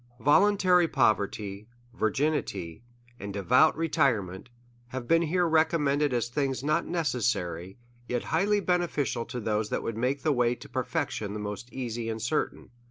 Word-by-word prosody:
Voluntary 180 Hz, -, +4 dB
poverty, 105 Hz, -4 st, 0 dB, 0.3 s
virginity, 120 Hz, -, -1 dB, 0.4 s
and 100 Hz, -, -6 dB
devout 125 Hz, -, +3 dB
retirement, 125 Hz, -, 0 dB, 0.4 s
have 125 Hz, -1 st, -6 dB
been 165 Hz, 0 st, +4 dB
here 175 Hz, +2 st, +1 dB
re 160 Hz, -1 st, +5 dB
commended 150 Hz, -3 st, 0 dB
as 120 Hz, -2 st, 0 dB
things 135 Hz, +1 st, -2 dB
not 155 Hz, +3 st, +1 dB
necessary, 115 Hz, -, -1 dB, 0.3 s
yet 125 Hz, -1 st, -2 dB
highly 205 Hz, +1 st, +1 dB
bene 180 Hz, -2 st, +1 dB
ficial 130 Hz, -7 st, -2 dB
to 125 Hz, -, -5 dB
tiiose 105 Hz, -1 st, -1 dB
tliat -, -, -2 dB
would 115 Hz, -, -4 dB
make 130 Hz, +3 st, -1 dB
the 155 Hz, -, +2 dB
way 125 Hz, -1 st, +2 dB
to -, -, -12 dB
perfection 105 Hz, -2 st, -3 dB
the 105 Hz, -, -4 dB
most 105 Hz, +4 st, -6 dB
easy 120 Hz, -3 st, -4 dB
and 110 Hz, 0 st, -3 dB
certain. 125 Hz, +7 st, -2 dB
125 Hz, 155 wpm, -28 LUFS, 110-155 Hz, 0.4 s, re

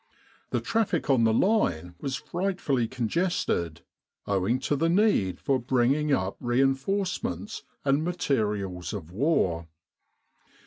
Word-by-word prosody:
The -, -, -1 dB
traffic 210 Hz, -10 st, 0 dB
on 120 Hz, -4 st, +4 dB
the 110 Hz, -, +4 dB
line 110 Hz, -, +1 dB
was 135 Hz, -2 st, -2 dB
frightfully 150 Hz, -5 st, -1 dB
congested 120 Hz, -, -1 dB, 0.4 s
owing 100 Hz, +4 st, +1 dB
to 145 Hz, -, 0 dB
the 165 Hz, +4 st, +1 dB
need 170 Hz, -, +2 dB
for 135 Hz, -2 st, +1 dB
bringing 130 Hz, +5 st, +1 dB
up 95 Hz, -7 st, 0 dB
rein 130 Hz, +2 st, +3 dB
forcements 135 Hz, -, -3 dB, 0.2 s
and 140 Hz, +2 st, +2 dB
materials 105 Hz, -, -1 dB
of 80 Hz, +2 st, -6 dB
war. 95 Hz, -, +1 dB
130 Hz, 120 wpm, -27 LUFS, 100-165 Hz, 0.4 s, on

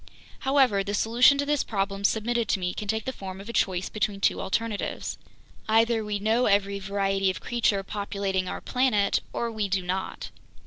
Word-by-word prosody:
"However, 265 Hz, -7 st, +3 dB
the 205 Hz, +1 st, -2 dB
solution 240 Hz, +6 st, +5 dB
to 285 Hz, -, 0 dB
this 295 Hz, -1 st, +1 dB
problem 195 Hz, -1 st, -2 dB
submitted 230 Hz, +2 st, +1 dB
to -, -, +1 dB
me 180 Hz, -1 st, -2 dB
can 210 Hz, -, -6 dB
take 220 Hz, +2 st, -1 dB
the 260 Hz, -, -3 dB
form 190 Hz, -4 st, -8 dB
of 200 Hz, -, -10 dB
a -, -, -5 dB
choice 185 Hz, -4 st, +1 dB
between 210 Hz, -2 st, -2 dB
two -, -, +1 dB
alternatives. 220 Hz, +1 st, -2 dB, 0.5 s
"Either 225 Hz, 0 st, +3 dB
we 210 Hz, -1 st, -2 dB
know 220 Hz, +4 st, +2 dB
every 200 Hz, 0 st, +2 dB
variety 195 Hz, 0 st, 0 dB
of 185 Hz, -, -3 dB
creature 220 Hz, -4 st, 0 dB
populating 200 Hz, -2 st, -2 dB
our -, -, -5 dB
planet, 240 Hz, -6 st, +2 dB
or 235 Hz, -1 st, -2 dB
we 215 Hz, -2 st, -2 dB
do 190 Hz, -1 st, 0 dB
not. 185 Hz, +1 st, -4 dB
205 Hz, 185 wpm, -26 LUFS, 195-230 Hz, 0.5 s, solution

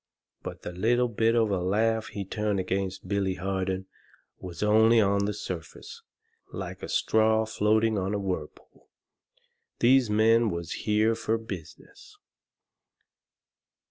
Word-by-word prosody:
But -, -, -8 dB
the -, -, -5 dB
little 120 Hz, +7 st, +1 dB
bit 115 Hz, +1 st, +1 dB
of 110 Hz, -3 st, +2 dB
a 95 Hz, -, 0 dB
laugh 110 Hz, +4 st, +1 dB
he 100 Hz, -1 st, -6 dB
turned 105 Hz, 0 st, -1 dB
against 95 Hz, 0 st, -3 dB
Billy 100 Hz, -2 st, 0 dB
Harden 95 Hz, 0 st, -2 dB, 0.5 s
was 90 Hz, +1 st, -6 dB
only 110 Hz, +2 st, +5 dB
on 100 Hz, -1 st, +2 dB
the 105 Hz, -, -1 dB
surface, 85 Hz, -7 st, -8 dB, 0.5 s
like -, -, -7 dB
a -, -, -7 dB
straw 110 Hz, 0 st, +2 dB
floating 110 Hz, 0 st, +1 dB
on 95 Hz, +2 st, -2 dB
a -, -, -1 dB
whirlpool. 90 Hz, -6 st, -6 dB, 0.9 s
These 125 Hz, -1 st, +4 dB
men 110 Hz, +2 st, +4 dB
was 85 Hz, -2 st, -5 dB
here 110 Hz, +1 st, +1 dB
fur 115 Hz, 0 st, -1 dB
business. 95 Hz, -8 st, -11 dB
105 Hz, 130 wpm, -27 LUFS, 95-110 Hz, 0.9 s, only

